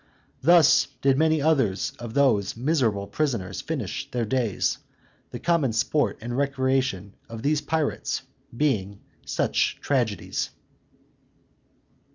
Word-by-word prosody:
Thus 165 +1 +6 0.2
did 135 -1 +4
many 160 -2 +2
others 130 -12 +1
of 120 -1 -7
those 115 -8 +2
miserable 120 -7 +1
prisoners 110 -8 -2
finish 135 - -4
their 120 -2 -1
days, 115 -3 0 0.5
the - - -6
common 165 -9 +1
sport 145 +6 +1
and 120 +2 -4
recreation 130 -7 0 0.2
of 115 0 -8
these 150 +1 +1
pirates 160 -2 -1 0.3
being 100 -9 0 0.3
such - - 0
tragedies. 120 - -1
130 Hz, 110 wpm, -25 LUFS, 110-150 Hz, 0.5 s, Thus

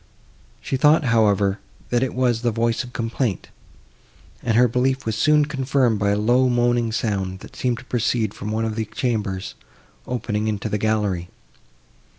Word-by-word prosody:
She 135 - -2
thought, 150 +4 +5
however, 105 -5 +2 0.3
that 120 0 +2
it 130 -2 -1
was 125 -3 +1
the 120 - +1
voice 115 +1 0
of 125 - -11
complaint, 115 -3 -2 0.9
and 115 - +1
her 125 +1 +6
belief 130 +3 0
was 110 -1 -1
soon 150 +6 +4
confirmed 135 -5 +1
by 100 0 +1
a 100 - +2
low 120 +5 +3
moaning 120 -1 +1
sound, 95 -5 -2
that - - -12
seemed 125 -2 -1
to 130 - -11
proceed 115 -3 0
from 105 - -6
one 110 +1 -1
of 110 -1 -3
the 110 0 -2
chambers, 110 -4 -2 0.5
opening 110 -3 -2
into 105 -2 -2
the 105 - -1
gallery. 105 -5 0
115 Hz, 165 wpm, -22 LUFS, 105-125 Hz, 0.9 s, her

